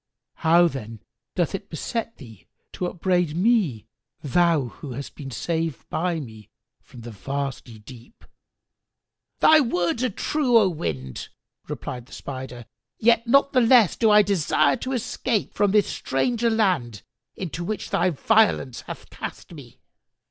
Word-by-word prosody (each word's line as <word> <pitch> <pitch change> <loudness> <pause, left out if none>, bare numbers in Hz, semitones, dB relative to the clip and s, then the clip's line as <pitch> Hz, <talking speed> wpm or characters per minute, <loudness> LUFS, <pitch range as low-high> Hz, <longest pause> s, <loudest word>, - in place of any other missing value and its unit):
How, 170 +2 +5
then, 115 -7 -7 0.3
doth 175 -4 0
it 195 - -6
beset 230 +8 -4
thee 115 - -14 0.3
to 180 - -2
upbraid 180 -2 0
me, 185 - +2 0.4
thou 155 -2 +2
who 135 +1 -9
hast 140 +3 -7
been 140 -3 -8
saved 165 +2 -3
by 170 0 -1
me 110 -7 -11 0.3
from 120 - -14
the 120 +1 -8
vasty 135 +1 -5
deep?" 120 - -15 1.2
"Thy 315 0 +7
words 205 - 0
are 255 - +2
true, 255 +3 +1
O 205 -4 +4
Wind," 70 - -5 0.4
replied 125 -1 -6
the - - -15
Spider, 130 -3 -7 0.3
"yet 230 +1 +3
not 275 +3 +4
the 255 - +4
less 230 -4 +5
do 225 - +3
I 210 0 +7
desire 155 -7 +2
to 260 - -4
escape 240 -2 -2
from 205 - +2
this 205 0 +4
stranger 235 - 0
land 175 - 0 0.3
into 175 -2 -5
which 215 +3 -4
thy 180 +2 +2
violence 190 - +2
hath - - -8
cast - - -8
me." 135 -7 -13
170 Hz, 145 wpm, -24 LUFS, 130-220 Hz, 1.2 s, Thy